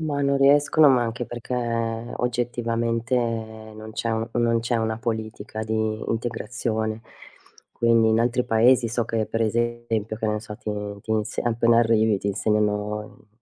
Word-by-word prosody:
Ma 145 -3 -2
non 140 0 +2
riescono, 145 +2 +5
ma 125 -3 +4
anche 120 +1 -3
perché 120 +1 -6 0.6
oggettivamente 115 -1 -1
non 110 -2 -4
c'è 115 +1 -2
u 110 +1 -1
non 115 -1 +2
c'è 115 +2 -2
una 110 -1 -1
politica 110 -2 -4
di 110 0 -2 0.4
integrazione. 110 -1 -2 0.7
Quindi 115 -1 +3
in 110 0 +3
altri 120 +1 +1
Paesi 120 +1 +4
so 115 +1 -1
che 110 -1 -1
per 115 - -1
esempio 115 -1 -1
che 110 - -2
ne 105 0 -1
so 105 -1 -9
ti 110 - -8 0.3
ti 110 - -10
ins 110 0 -2
appena 115 0 +3
arrivi 110 -3 +3
ti - - -6
insegnano 105 +1 -1
115 Hz, 150 wpm, -24 LUFS, 110-120 Hz, 0.7 s, riescono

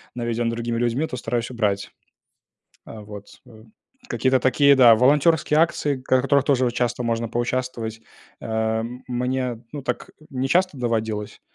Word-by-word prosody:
наведён 120 -1 -1
другими 115 0 -3
людьми, 120 +6 0
то 125 - -6
стараюсь 120 +1 -3
убрать. 105 -4 -1 0.9
А, 110 - -10
вот, 105 -1 -10 0.2
э, 110 -1 -15 0.5
какие-то 130 0 +2
такие, 140 +2 +4
да, 120 -3 +8
волонтёрские 150 +5 +3
акции, 155 -4 +1
к 130 0 +2
в - - 0
которых 140 0 +3
тоже 130 -3 +2
вот 120 - -1
часто 120 0 -1
можно 115 -1 -1
поучаствовать, 120 -2 -3 0.4
ам, 110 +2 -2
мне, 125 -1 -2
ну, 145 - -5
так - - -4 0.2
не 130 0 -2
часто 180 -2 +1
доводилось 110 -3 -3
120 Hz, 150 wpm, -23 LUFS, 115-130 Hz, 0.9 s, да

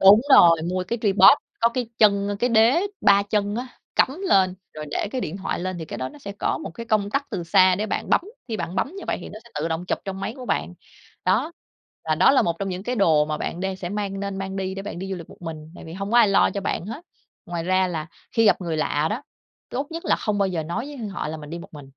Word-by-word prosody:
Đúng 200 +3 +8
rồi, 165 -2 +7
mua 185 0 -1
cái 235 - -1
Tripod 205 -1 +1 0.4
có 230 - +5
cái 240 -1 -3
chân, 200 -2 +4
ơ, 205 - -2
cái 245 +2 +1
đế 230 +8 +5 0.2
ba 200 0 +5
chân 205 0 -1
á 250 +2 -3 0.3
cắm 280 +8 +2
lên 185 - +4 0.2
rồi 155 0 -6
để 205 - -1
cái 255 - -2
điện 170 -1 -4
thoại 190 - -3
lên 185 -1 -3
thì 160 - -5
cái - - -7
đó 130 - -3
nó - - -14
sẽ 200 -7 -7
có - - 0
một - - -6
cái 230 0 -7
công 205 -2 +1
tắc 280 +2 -2
từ 190 -5 -3
xa 185 +1 +5
để 210 +3 -2
bạn - - -3
bấm, - - +5 0.3
khi 220 - -2
bạn 175 -1 -4
bấm - - 0
như 385 - -7
vậy - - 0
thì - - -8
nó 215 - -9
sẽ 235 - -17
tự 155 +3 -1
động 165 +2 -2
chụp - - -1
trong 195 -1 -5
máy 215 +4 -3
của 250 -1 -8
bạn, - - -1 0.5
đó. 330 - +1 0.5
Và 155 -1 +1
đó 180 +10 +5
là 275 - +4
một 165 -1 -1
trong 195 - -2
những 185 +1 -4
cái 245 +3 -2
đồ 160 -7 +4
mà 155 0 -2
bạn 175 - -4
đang 190 0 -2
sẽ 175 -2 -5
mang 200 -1 -3
nên 200 -1 -4
mang 195 0 -4
đi 190 0 -3
để 195 - -5
bạn 200 -4 -6
đi 190 +1 -5
du - - -1
lịch 170 - -10
một - - -16
mình, 160 -1 -7
tại - - -11
vì 160 - -9
hông 195 +3 -5
có 240 - +3
ai 230 -3 +7
lo 200 - +4
cho 200 - -3
bạn 190 -2 -2
hết. 285 +11 -7 0.4
Ngoài 170 -1 -3
ra 185 +1 +2
là 160 -3 -4 0.3
khi 225 - +3
gặp 205 - +4
người 165 -3 -2
lạ 155 0 0
đó, 235 +6 -3 0.5
tốt 275 +3 -2
nhất 330 +1 -6
là - - +3
không 210 -1 -1
bao 195 -1 +2
giờ 170 -3 -2
nói 170 - -3
với 270 -7 -6
họ 185 -5 -4
là 160 - -4
mình 150 -1 -10
đi 170 - -5
một - - -10
mình. 145 - -9
195 Hz, 290 wpm, -24 LUFS, 170-220 Hz, 0.5 s, Đúng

